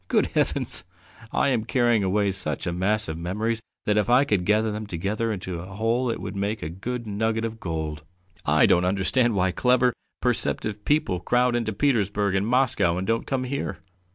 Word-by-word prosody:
Good -, -, +3 dB
heavens! -, -, 0 dB, 0.5 s
I -, -, +2 dB
am 120 Hz, -5 st, +1 dB
carrying 120 Hz, -3 st, +2 dB
away 100 Hz, +1 st, +1 dB
such 75 Hz, -6 st, -2 dB
a 85 Hz, -, -1 dB
mass 105 Hz, +4 st, 0 dB
of 80 Hz, 0 st, -5 dB
memories 110 Hz, +6 st, -2 dB, 0.2 s
that 105 Hz, 0 st, +3 dB
if 105 Hz, -, 0 dB
I 125 Hz, +3 st, +6 dB
could 100 Hz, -9 st, 0 dB
gather 110 Hz, +2 st, +2 dB
them 105 Hz, 0 st, -5 dB
together 105 Hz, +5 st, -2 dB
into 90 Hz, -4 st, -4 dB
a 95 Hz, +2 st, -9 dB
whole 115 Hz, +4 st, +1 dB
it 115 Hz, -, -2 dB
would -, -, -6 dB
make 100 Hz, +2 st, -2 dB
a 80 Hz, -, -3 dB
good 115 Hz, +8 st, -5 dB
nugget 110 Hz, +2 st, -1 dB
of 115 Hz, 0 st, -5 dB
gold! 80 Hz, -4 st, -4 dB, 0.4 s
I -, -, +4 dB
don't 90 Hz, -, +4 dB
understand 100 Hz, +6 st, +2 dB
why 95 Hz, -1 st, +2 dB
clever, 125 Hz, +3 st, +3 dB, 0.3 s
perceptive 105 Hz, -1 st, 0 dB
people 145 Hz, -, +1 dB
crowd 120 Hz, +6 st, +2 dB
into 115 Hz, -2 st, -1 dB
Petersburg 105 Hz, -5 st, +1 dB
and 95 Hz, +2 st, +1 dB
Moscow 120 Hz, -9 st, +2 dB
and 95 Hz, -, -2 dB
don't 115 Hz, +2 st, -1 dB
come 135 Hz, -2 st, -1 dB
here. 140 Hz, +2 st, -3 dB
105 Hz, 190 wpm, -25 LUFS, 95-120 Hz, 0.5 s, I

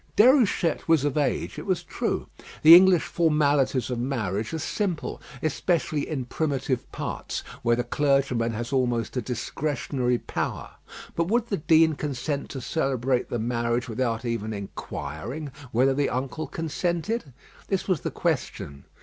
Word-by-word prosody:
Déruchette 220 Hz, -, +4 dB
was 160 Hz, -4 st, +4 dB
of 145 Hz, -, 0 dB
age, 145 Hz, -2 st, -1 dB
it -, -, -8 dB
was -, -, 0 dB
true. -, -, -2 dB, 0.4 s
The 160 Hz, +2 st, +11 dB
English 180 Hz, -1 st, +8 dB
formalities 145 Hz, -6 st, +2 dB
of 120 Hz, -, -2 dB
marriage 110 Hz, -5 st, -2 dB
are 160 Hz, -, -2 dB
simple, 175 Hz, +1 st, -2 dB, 0.2 s
especially 155 Hz, -1 st, 0 dB
in 135 Hz, -5 st, -2 dB
primitive 135 Hz, -2 st, -2 dB
parts, -, -, -4 dB, 0.2 s
where 120 Hz, 0 st, +3 dB
the 120 Hz, -, -1 dB
clergyman 135 Hz, -3 st, +1 dB
has 120 Hz, +4 st, -4 dB
almost 120 Hz, -3 st, 0 dB
a 125 Hz, -, 0 dB
discretionary 125 Hz, +1 st, -1 dB
power; -, -, -4 dB, 0.4 s
but 170 Hz, 0 st, +1 dB
would 235 Hz, +3 st, +1 dB
the 200 Hz, -, 0 dB
Dean 160 Hz, +1 st, +4 dB
consent 145 Hz, 0 st, -3 dB
to 135 Hz, -, -6 dB
celebrate 130 Hz, -3 st, 0 dB
the -, -, -1 dB
marriage 120 Hz, +1 st, -1 dB
without 115 Hz, 0 st, -1 dB
even 110 Hz, -2 st, -2 dB
inquiring 105 Hz, -, -6 dB, 0.2 s
whether 130 Hz, +4 st, +3 dB
the 140 Hz, +1 st, +1 dB
uncle 135 Hz, +5 st, -3 dB
consented? 170 Hz, -, -2 dB, 0.4 s
This 195 Hz, -2 st, -1 dB
was 185 Hz, -7 st, +1 dB
the -, -, -2 dB
question. 70 Hz, -1 st, -3 dB
135 Hz, 145 wpm, -26 LUFS, 120-160 Hz, 0.4 s, The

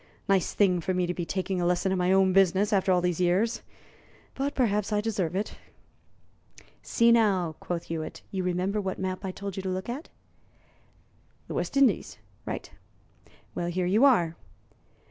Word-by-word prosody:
Nice 195 Hz, -3 st, +1 dB
thing 180 Hz, -4 st, +3 dB
for 185 Hz, +3 st, -1 dB
me 180 Hz, -1 st, +1 dB
to 175 Hz, -, -2 dB
be 175 Hz, -2 st, -4 dB
taking 185 Hz, -1 st, -2 dB
a -, -, 0 dB
lesson 180 Hz, +2 st, +1 dB
in 190 Hz, -, +1 dB
my 180 Hz, +1 st, +2 dB
own 190 Hz, -1 st, +4 dB
business 195 Hz, +2 st, +3 dB
after 195 Hz, -1 st, +2 dB
all 180 Hz, -1 st, +3 dB
these 180 Hz, -1 st, -1 dB
years! 195 Hz, +7 st, +1 dB, 0.7 s
But 275 Hz, +1 st, -2 dB
perhaps 210 Hz, -5 st, +1 dB
I 210 Hz, -, +2 dB
deserve 195 Hz, -6 st, -2 dB
it." 200 Hz, +2 st, -3 dB, 1.2 s
"See, 235 Hz, 0 st, +3 dB
now," 195 Hz, -8 st, +2 dB
quoth 175 Hz, -1 st, -4 dB
Hewitt, 160 Hz, -1 st, -6 dB
"you 190 Hz, -2 st, -2 dB
remember 180 Hz, +3 st, -1 dB
what 190 Hz, -1 st, -3 dB
map 185 Hz, +1 st, -3 dB
I 190 Hz, -, -3 dB
told 200 Hz, +1 st, -6 dB
you -, -, -2 dB
to 190 Hz, -, -4 dB
look 185 Hz, +4 st, -4 dB
at?" 270 Hz, +7 st, -5 dB, 1.4 s
"The -, -, -6 dB
West -, -, -2 dB
Indies." 265 Hz, -9 st, +2 dB, 0.3 s
"Right! -, -, -5 dB, 0.8 s
Well, 175 Hz, -, -3 dB
here 180 Hz, +1 st, -1 dB
you 205 Hz, +8 st, +3 dB
are." 175 Hz, -12 st, +4 dB
190 Hz, 175 wpm, -27 LUFS, 180-210 Hz, 1.4 s, own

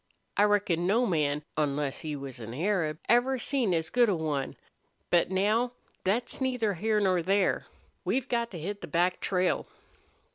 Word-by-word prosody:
I 205 Hz, -, +5 dB
reckon 190 Hz, -5 st, +2 dB
no 230 Hz, +6 st, +3 dB
man, 150 Hz, -6 st, 0 dB
onless 145 Hz, -2 st, -1 dB
he 155 Hz, -2 st, -4 dB
was 135 Hz, -3 st, -7 dB
an 115 Hz, +1 st, -7 dB
Arab, 165 Hz, -2 st, 0 dB
ever 245 Hz, +3 st, +3 dB
seen 250 Hz, -4 st, 0 dB
as 160 Hz, -2 st, 0 dB
good 245 Hz, -2 st, +4 dB
a 195 Hz, -, +2 dB
one. 150 Hz, -4 st, -2 dB, 0.6 s
But 175 Hz, -1 st, +4 dB
now 215 Hz, +6 st, +1 dB, 0.3 s
thet's 235 Hz, +8 st, 0 dB
neither 250 Hz, -5 st, +1 dB
here 215 Hz, +4 st, +1 dB
nor 185 Hz, -3 st, +2 dB
there.... 195 Hz, +3 st, +1 dB, 0.4 s
We've 265 Hz, 0 st, 0 dB
got 235 Hz, -2 st, 0 dB
to 185 Hz, -, -7 dB
hit 200 Hz, +6 st, -5 dB
the -, -, -6 dB
back 180 Hz, +2 st, +1 dB
trail." 185 Hz, -1 st, 0 dB
190 Hz, 170 wpm, -29 LUFS, 160-225 Hz, 0.6 s, I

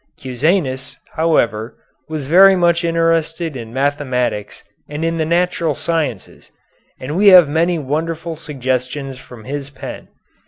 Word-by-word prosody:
Cusanus, 130 Hz, +1 st, -1 dB, 0.2 s
however, 115 Hz, -9 st, 0 dB, 0.3 s
was 155 Hz, -3 st, -4 dB
very 190 Hz, +6 st, +7 dB
much 170 Hz, -1 st, +2 dB
interested 165 Hz, -1 st, 0 dB
in 115 Hz, -3 st, -7 dB
mathematics 130 Hz, -5 st, -2 dB, 0.3 s
and 150 Hz, +2 st, -3 dB
in 165 Hz, 0 st, -1 dB
the 160 Hz, -, +1 dB
natural 170 Hz, -2 st, 0 dB
sciences, 155 Hz, -, -3 dB, 0.5 s
and 140 Hz, +4 st, -5 dB
we 205 Hz, +3 st, +3 dB
have 180 Hz, -5 st, +9 dB
many 165 Hz, +4 st, +1 dB
wonderful 160 Hz, +3 st, -3 dB
suggestions 130 Hz, -2 st, -3 dB
from 125 Hz, -4 st, -13 dB
his 140 Hz, +2 st, -5 dB
pen. 140 Hz, -, -9 dB
150 Hz, 125 wpm, -18 LUFS, 130-165 Hz, 0.5 s, have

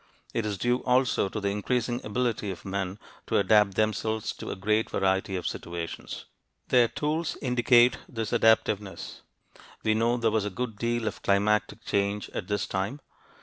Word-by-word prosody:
It 110 Hz, -2 st, -1 dB
is 100 Hz, -2 st, -2 dB
due 120 Hz, +5 st, +1 dB
also 125 Hz, -6 st, +2 dB
to 105 Hz, -, -4 dB
the 100 Hz, -1 st, -1 dB
increasing 120 Hz, +4 st, -1 dB
ability 110 Hz, -1 st, -1 dB
of 90 Hz, -3 st, -7 dB
men 95 Hz, -1 st, -3 dB, 0.3 s
to -, -, +2 dB
adapt 100 Hz, 0 st, +4 dB
themselves 110 Hz, 0 st, 0 dB
to -, -, -6 dB
a -, -, -3 dB
great 105 Hz, +3 st, +1 dB
variety 95 Hz, 0 st, 0 dB
of 90 Hz, -, -4 dB
situations. 85 Hz, -1 st, -5 dB, 0.4 s
Their 125 Hz, -2 st, +5 dB
tools 155 Hz, +6 st, -2 dB
indicate 125 Hz, -1 st, +4 dB
this 115 Hz, -3 st, -4 dB
adaptiveness. 105 Hz, -3 st, +1 dB, 0.6 s
We 110 Hz, -, +3 dB
know 115 Hz, +2 st, +2 dB
there 115 Hz, -2 st, +1 dB
was 110 Hz, -1 st, +1 dB
a -, -, -1 dB
good 110 Hz, +1 st, -4 dB
deal 120 Hz, -1 st, 0 dB
of -, -, -4 dB
climatic 105 Hz, +2 st, +1 dB
change 100 Hz, +1 st, -1 dB
at 90 Hz, -, -5 dB
this 105 Hz, -1 st, 0 dB
time. 100 Hz, +9 st, -2 dB
110 Hz, 165 wpm, -27 LUFS, 100-120 Hz, 0.6 s, Their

